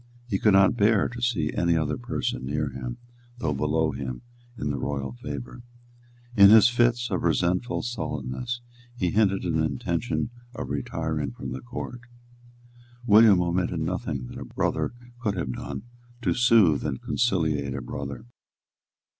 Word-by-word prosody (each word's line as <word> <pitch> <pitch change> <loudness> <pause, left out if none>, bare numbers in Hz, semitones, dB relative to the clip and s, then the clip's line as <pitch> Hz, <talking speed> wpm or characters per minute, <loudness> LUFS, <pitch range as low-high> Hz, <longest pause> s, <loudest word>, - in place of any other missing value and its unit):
He 100 -5 -1
could 105 - +4
not 95 +3 +5
bear 105 -2 +3
to 120 0 -8
see 100 -12 0
any 85 -1 +2
other 75 -2 0
person 60 0 -3
near 75 +2 -2
him, 65 -2 -6 0.4
though 80 -11 -1
below 75 +2 +1
him, 65 -2 -5 0.3
in 75 -6 -2
the 70 - -3
royal 70 -2 -3
favour. 65 - -7 0.7
In 100 -2 +9
his 110 +2 +8
fits 120 -1 +2
of 90 - 0
resentful 90 +7 0
sullenness, 120 - -4 0.4
he 90 -6 0
hinted 100 -3 +2
an 80 -2 +1
intention 85 - -1 0.2
of 65 - -5
retiring 75 0 -2
from - - -7
the 65 - -5
Court. 120 - -7 1.0
William 105 -4 +7
omitted 85 -1 -1
nothing 80 - -3
that - - -8
a - - -5
brother - - -1 0.2
could 105 -5 -1
have 65 -8 -2
done 80 - -6 0.4
to - - +2
soothe 115 - +4
and 70 -4 -2
conciliate 80 - 0
a - - -4
brother. 70 -3 -6
85 Hz, 150 wpm, -26 LUFS, 70-110 Hz, 1.0 s, In